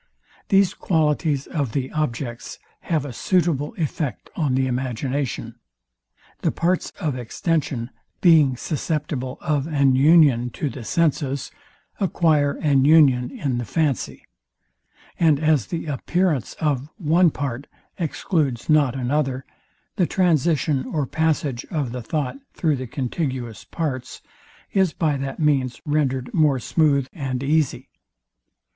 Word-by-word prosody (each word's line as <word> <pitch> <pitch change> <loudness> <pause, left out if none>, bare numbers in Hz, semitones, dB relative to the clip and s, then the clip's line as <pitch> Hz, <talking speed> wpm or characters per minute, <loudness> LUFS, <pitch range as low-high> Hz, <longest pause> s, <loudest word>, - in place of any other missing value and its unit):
These 195 -1 +4
qualities 150 -3 0
of 140 -8 -3
the 135 -2 -2
objects 120 -5 -3 0.2
have 155 -4 -1
a 135 - -6
suitable 165 - 0
effect 140 - -3
on 145 -6 0
the 130 0 +2
imagination. 130 +1 -3 0.8
The - - +1
parts 180 +2 0
of 155 -8 -1
extension 130 0 -2 0.3
being 155 -7 +5
susceptible 145 -3 -3
of 150 -3 0
an 140 -4 +3
union 140 -4 +5
to 145 - -2
the 130 - -8
senses, 140 -2 0 0.5
acquire 155 -7 +2
an 140 -3 +2
union 140 -5 +5
in 130 -4 -2
the - - -2
fancy; 145 +4 -1 0.9
and 155 -4 +4
as 155 -6 +2
the 170 -2 -4
appearance 155 - 0
of 145 -3 -1
one 170 +1 +4
part 140 -2 -4 0.3
excludes 150 -6 -1
not 145 -5 +4
another, 130 0 -1 0.5
the 180 - +2
transition 155 -6 +2
or 150 0 -2
passage 150 -3 -1
of 145 -8 -2
the 125 0 -5
thought 135 +1 -3 0.2
through 155 -4 +1
the 130 0 -5
contiguous 130 -4 -4
parts 130 -6 -4 0.5
is 190 -4 +2
by 155 -4 0
that 135 0 -5
means 135 -5 +1
rendered 135 -4 0
more 150 -4 +3
smooth 140 0 +2
and 135 -5 -3
easy. 150 0 0
145 Hz, 125 wpm, -22 LUFS, 130-160 Hz, 0.9 s, being